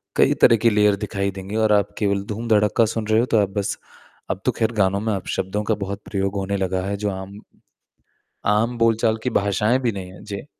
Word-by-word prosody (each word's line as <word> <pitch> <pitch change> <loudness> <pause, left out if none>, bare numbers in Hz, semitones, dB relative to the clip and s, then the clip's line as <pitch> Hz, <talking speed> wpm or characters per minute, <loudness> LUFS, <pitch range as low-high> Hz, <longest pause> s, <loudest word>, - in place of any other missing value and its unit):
कई - - +4
तरह 115 - +7
की 115 +2 +3
लेयर 105 -1 +3
दिखाई 100 -1 -2
देंगी 95 +2 -7
और 110 -1 +2
आप 100 -1 +1
केवल 100 -2 0
धूम-धड़क्का 110 +1 +2
सुन 110 0 -3
रहे 110 +1 +3
हो, 120 - +2
तो 115 - +1
आप 100 - 0
बस 100 - -1 0.5
अब 95 - -3
तो 125 - +3
ख़ैर 115 -1 -1
गानों 100 -1 +2
में 110 0 -1
अपशब्दों 95 +1 -3
का 110 +1 0
बहुत 100 0 -5
प्रयोग 100 -1 -2
होने 100 0 -1
लगा 95 -1 -1
है। 100 - -2
जो 105 0 -2
आम 95 +1 -7 1.2
आम 115 +3 0
बोलचाल 115 -1 +2
की 125 - -1
भाषाएँ 105 +3 +1
भी 120 -3 0
नहीं 95 -2 -7
हैं, 95 - -13
जी। 100 +3 -7
105 Hz, 215 wpm, -22 LUFS, 100-110 Hz, 1.2 s, तरह